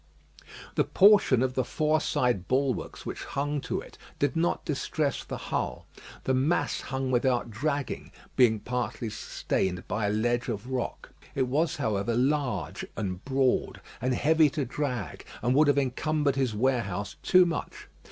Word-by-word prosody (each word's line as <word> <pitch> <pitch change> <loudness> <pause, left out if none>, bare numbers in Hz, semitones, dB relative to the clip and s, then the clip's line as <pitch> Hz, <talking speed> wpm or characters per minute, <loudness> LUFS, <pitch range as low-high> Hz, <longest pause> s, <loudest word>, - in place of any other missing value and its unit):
The - - +3
portion 195 - +5
of 130 -1 0
the 130 - +1
fore 155 +4 +1
side 120 - 0
bulwarks 130 -2 -1
which - - -5
hung 145 +1 -2
to - - -3
it - - -14 0.2
did 145 +2 0
not 170 +1 0
distress 145 0 -1
the - - -5
hull. - - -3 0.4
The 130 - +1
mass 145 +3 +1
hung 130 -1 -3
without 120 -1 +1
dragging, 140 +4 -2 0.2
being 110 -4 +4
partly 125 -1 -3
sustained 90 -3 -2
by 105 0 -1
a - - +1
ledge 120 +3 0
of 115 +2 -4
rock. 125 -2 -3 0.2
It 130 -2 +1
was, 155 +6 +1
however, 110 -4 -1
large 125 - 0
and 95 -3 -3
broad, 135 -1 +1 0.2
and 130 +1 +1
heavy 155 +2 +4
to 145 -1 -2
drag, 125 - -3 0.2
and 120 +1 +3
would 150 +3 +5
have 145 -1 +3
encumbered 140 +2 +1
his 130 -5 0
warehouse 105 -5 -1
too 185 -1 +6
much. 170 -2 -4
130 Hz, 155 wpm, -28 LUFS, 120-145 Hz, 0.4 s, too